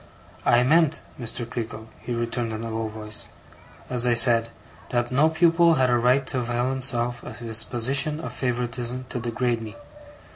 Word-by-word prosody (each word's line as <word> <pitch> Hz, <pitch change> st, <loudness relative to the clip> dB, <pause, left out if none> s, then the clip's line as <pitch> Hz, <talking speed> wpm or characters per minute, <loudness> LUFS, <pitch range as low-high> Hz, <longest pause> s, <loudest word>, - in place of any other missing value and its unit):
'I 120 Hz, +1 st, +4 dB
meant, 160 Hz, +3 st, +2 dB, 0.2 s
Mr. 120 Hz, 0 st, -3 dB
Creakle,' 115 Hz, -2 st, -6 dB
he 120 Hz, -, -5 dB
returned 115 Hz, -1 st, -3 dB
in 110 Hz, +1 st, -6 dB
a 115 Hz, -, -5 dB
low 110 Hz, 0 st, -3 dB
voice, 110 Hz, 0 st, -2 dB, 0.6 s
'as 125 Hz, -1 st, +2 dB
I 120 Hz, -, +2 dB
said; 115 Hz, -1 st, +5 dB, 0.4 s
that 120 Hz, 0 st, -2 dB
no 145 Hz, +5 st, +3 dB
pupil 165 Hz, +1 st, +3 dB
had 130 Hz, -2 st, +1 dB
a 120 Hz, -, +3 dB
right 125 Hz, +3 st, +2 dB
to 130 Hz, -, -3 dB
avail 120 Hz, +1 st, -2 dB
himself 120 Hz, -2 st, +2 dB
of -, -, -10 dB
his 115 Hz, -1 st, +5 dB
position 135 Hz, +5 st, +1 dB
of -, -, -7 dB
favouritism 125 Hz, 0 st, -4 dB
to 125 Hz, -, -4 dB
degrade 120 Hz, 0 st, -2 dB
me. 110 Hz, -1 st, -9 dB
120 Hz, 175 wpm, -23 LUFS, 115-130 Hz, 0.6 s, said